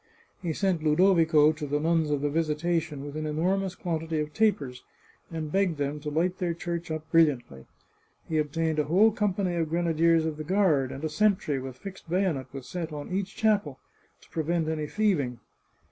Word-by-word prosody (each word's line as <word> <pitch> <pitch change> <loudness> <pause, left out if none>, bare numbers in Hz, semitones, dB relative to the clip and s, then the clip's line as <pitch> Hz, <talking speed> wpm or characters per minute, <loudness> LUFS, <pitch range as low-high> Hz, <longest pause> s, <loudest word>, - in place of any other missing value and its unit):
He 170 - -2
sent 185 0 0
Ludovico 160 -1 +4
to 155 -1 -5
the 145 +1 0
Nuns 160 0 +1
of 145 -2 0
the 145 - +1
Visitation 155 -1 -1
with 145 0 -7
an 155 0 -3
enormous 185 +5 0
quantity 165 -2 -2
of 150 0 -3
tapers, 145 -12 0 0.5
and 160 -2 -5
begged 190 -4 +1
them 145 +1 -2
to 150 +1 -4
light 175 +5 0
their 175 -3 -1
church 170 0 -4
up 155 0 -4
brilliantly. 130 - +2 0.6
He 160 -1 0
ob 150 -1 -1
tained 160 -1 0
a 150 - +2
whole 195 +9 +5
company 200 -4 0
of 165 -2 0
grenadiers 165 -1 +2
of 155 -2 -3
the 155 - -5
guard, 155 -7 +2
and 135 - -7
a 155 - 0
sentry, 190 -5 +1
with 130 -1 -7
fixed 190 -1 -10
bayonet, 165 -8 0
was 135 -2 -8
set 170 -3 -4
on 150 +2 -7
each 195 +1 -2
chapel, 205 -11 +1 0.4
to - - -21
prevent 165 0 -1
any 155 -1 -2
thieving. 155 - 0
160 Hz, 190 wpm, -27 LUFS, 150-180 Hz, 0.6 s, whole